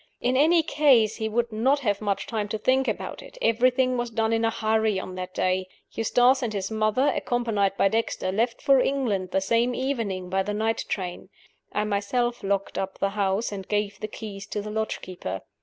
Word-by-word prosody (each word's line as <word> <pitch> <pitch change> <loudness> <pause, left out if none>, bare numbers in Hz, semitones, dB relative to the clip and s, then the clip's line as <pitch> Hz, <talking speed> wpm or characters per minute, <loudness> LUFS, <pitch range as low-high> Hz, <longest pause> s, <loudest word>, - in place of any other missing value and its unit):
In 250 +1 +1
any 320 +5 +5
case, 260 -9 +4
he 220 -1 -2
would 235 +1 0
not 260 +7 +2
have 205 -5 0
much 205 -2 -1
time 215 -2 -2
to 220 - -3
think 260 +5 +2
about - - -3
it. - - -13
Everything 255 - +2
was 240 0 -2
done 225 0 0
in 225 0 +1
a 225 - +3
hurry 220 -2 +1
on 185 - -7
that 185 0 -5
day. 185 0 0 0.2
Eustace 245 +4 +3
and 240 -3 -1
his 195 0 -3
mother, 220 +5 +2
accompanied 225 -5 0
by - - +4
Dexter, 220 -2 -1
left 230 +4 -1
for 275 -1 +5
England 235 -9 0
the 190 - +1
same 235 +5 +1
evening 230 -9 -2
by 190 +2 0
the 205 +2 -3
night 220 +1 -1
train. 180 -1 -4 0.4
I 210 - 0
myself 235 +4 -1
locked 200 0 -1
up 190 0 -4
the 195 - 0
house, 200 +2 0
and 195 -2 -6
gave 205 -1 -1
the 215 - -4
keys 200 -2 -8
to 210 - -3
the 210 - -6
lodge 220 0 -2
keeper. 95 - -6
220 Hz, 205 wpm, -25 LUFS, 200-245 Hz, 0.4 s, any